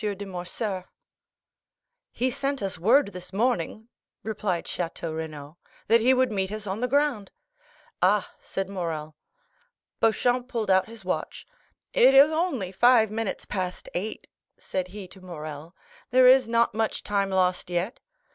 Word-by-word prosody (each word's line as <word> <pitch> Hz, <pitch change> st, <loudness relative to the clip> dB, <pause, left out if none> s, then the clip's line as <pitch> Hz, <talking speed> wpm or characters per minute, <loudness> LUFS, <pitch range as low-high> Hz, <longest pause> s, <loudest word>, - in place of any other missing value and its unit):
de 205 Hz, -1 st, -3 dB
Morcerf." 185 Hz, +1 st, -4 dB, 1.2 s
"He 255 Hz, +2 st, 0 dB
sent 275 Hz, -2 st, -2 dB
us 190 Hz, -3 st, -3 dB
word 230 Hz, -, +4 dB
this 180 Hz, -2 st, -10 dB
morning," 220 Hz, 0 st, -1 dB, 0.4 s
replied 205 Hz, -5 st, -2 dB
Château 165 Hz, -2 st, -4 dB
Renaud, 155 Hz, -1 st, -7 dB, 0.3 s
"that 230 Hz, +1 st, +5 dB
he 250 Hz, +3 st, +5 dB
would 255 Hz, -2 st, +3 dB
meet 190 Hz, -2 st, -1 dB
us 215 Hz, -1 st, -5 dB
on 195 Hz, +1 st, -3 dB
the 250 Hz, -, 0 dB
ground." 275 Hz, -6 st, +1 dB, 0.7 s
"Ah," -, -, +2 dB
said 195 Hz, -1 st, -4 dB
Morrel. 165 Hz, -5 st, -4 dB, 0.8 s
Beauchamp 245 Hz, +2 st, +2 dB
pulled 230 Hz, -6 st, -1 dB
out 190 Hz, 0 st, +4 dB
his 230 Hz, 0 st, -12 dB
watch. -, -, -3 dB, 0.5 s
"It 265 Hz, +2 st, +6 dB
is 280 Hz, +3 st, +8 dB
only 315 Hz, -, -1 dB
five 225 Hz, +2 st, +4 dB
minutes 225 Hz, -2 st, -3 dB
past 185 Hz, -3 st, -4 dB
eight," 210 Hz, +5 st, -4 dB, 0.3 s
said 185 Hz, -1 st, -3 dB
he 195 Hz, 0 st, -9 dB
to 190 Hz, +1 st, -15 dB
Morrel; 155 Hz, -2 st, -8 dB, 0.3 s
"there 255 Hz, +1 st, +5 dB
is 255 Hz, 0 st, +7 dB
not 230 Hz, -1 st, +2 dB
much 220 Hz, 0 st, -1 dB
time 200 Hz, -1 st, 0 dB
lost 185 Hz, -1 st, +1 dB
yet." 180 Hz, +7 st, -2 dB
205 Hz, 145 wpm, -26 LUFS, 180-240 Hz, 1.2 s, is